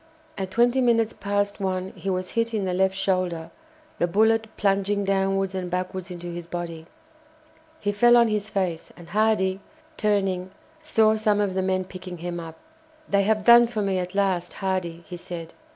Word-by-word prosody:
At 190 -1 -4
twenty 240 +5 +3
minutes 230 -2 +2
past 205 0 -1
one 185 -1 -2
he 195 - -4
was 185 -1 -2
hit 230 0 0
in 205 -3 -1
the 185 - -1
left 190 +1 +2
shoulder, 185 -4 -1 0.5
the 175 - +2
bullet 220 +4 +3
plunging 200 0 +1
downwards 195 0 +1
and 185 -1 -3
backwards 185 +1 -3
into 175 -1 -8
his 175 -1 -6
body. 170 -2 -6 0.9
He 205 - 0
fell 240 +4 +5
on 235 -1 +5
his 210 -1 -2
face, 185 -5 -2
and 170 -2 -13
Hardy, 200 -2 +2 0.4
turning, 195 -4 0 0.3
saw 220 -8 +3
some 210 -1 +2
of 200 -2 0
the 190 - 0
men 185 0 0
picking 185 -1 -8
him 175 +1 -5
up. 165 -1 -8 0.5
"They 200 0 +3
have 215 +1 +1
done 235 0 +8
for 220 -3 -2
me 195 -2 0
at 180 +1 -5
last, 190 -3 0
Hardy," 185 -3 -3
he 175 - -7
said. 170 -1 -8
190 Hz, 180 wpm, -25 LUFS, 180-210 Hz, 0.9 s, done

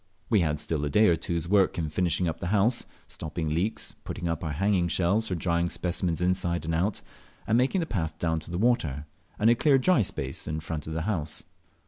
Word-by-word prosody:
We 110 - +5
had 75 -4 +1
still 75 -1 -1
a 75 - 0
day 105 +9 +5
or 85 - +4
two's 85 -1 -3
work 95 -1 +3
in 80 -2 -1
finishing 90 +2 0
up 80 - -3
the 85 - -3
house, 105 +5 +2 0.2
stopping 80 0 -4
leaks, 90 +8 -2
putting 85 - -4
up 85 -1 -2
our 80 -2 -2
hanging 95 +2 +2
shelves 95 +6 +1
for 90 - -1
drying 85 0 0
specimens 90 -2 -1
inside 90 -2 0
and 80 - -1
out, 95 +5 0 0.4
and 110 - +2
making 130 +10 +2
the - - -1
path 80 - -3
down 80 -1 0
to 80 - -9
the 85 - -3
water, 80 - +1 0.3
and 110 +2 +4
a - - +7
clear 135 +3 +4
dry 135 +1 +4
space 100 - -4
in 75 +1 -2
front 75 -1 -5
of 80 - -4
the 80 0 -2
horse. 80 -7 -2
85 Hz, 220 wpm, -27 LUFS, 80-105 Hz, 0.4 s, a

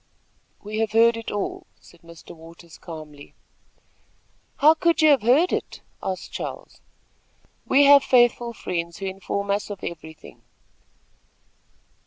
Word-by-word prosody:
"We 215 +1 -5
have 220 -1 -1
heard 230 +1 +4
it 230 0 -7
all," 365 - -5
said 170 - -20
Mr. 170 0 -14
Waters, 165 +1 -15
calmly. 155 -4 -11 1.2
"How 305 +2 +6
could 330 0 +1
you 310 - +6
have 275 - +3
heard 270 - +3
it?" - - -4 0.2
asked 185 -1 -5
Charles. - - -8 0.9
"We 275 +2 +4
have 280 0 +7
faithful 240 -1 +2
friends, 170 -5 -5
who 195 - -6
inform 195 +1 -4
us 205 +1 -2
of 200 -2 -8
everything." 160 -2 -10
205 Hz, 130 wpm, -23 LUFS, 170-255 Hz, 1.2 s, have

